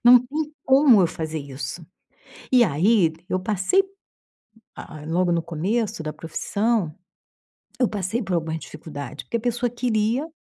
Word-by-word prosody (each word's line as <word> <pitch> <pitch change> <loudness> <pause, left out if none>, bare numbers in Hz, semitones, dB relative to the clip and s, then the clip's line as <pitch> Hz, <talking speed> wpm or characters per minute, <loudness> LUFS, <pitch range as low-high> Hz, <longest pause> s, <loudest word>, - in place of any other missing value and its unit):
Não 245 0 +8
tem 305 +2 -3
como 265 -5 +6
eu 180 - +5
fazer 160 -1 -4
isso.” 140 +3 -6 0.7
E 250 -2 +7
aí 180 0 +3 0.2
eu 185 - +1
passei, 205 - +2 1.0
hã, 150 -1 -9
logo 175 +2 +1
no 170 -1 +1
começo 180 +5 -2
da 155 -1 -4
profissão, 200 +2 -1 0.9
eu 250 - +4
passei 210 +3 -2
por 190 - -3
algumas 160 -1 -2
dificuldades. 145 -3 -8
Porque 235 - -2
a - - -7
pessoa 240 +1 0
queria. 235 +3 0
190 Hz, 145 wpm, -24 LUFS, 160-240 Hz, 1.0 s, Não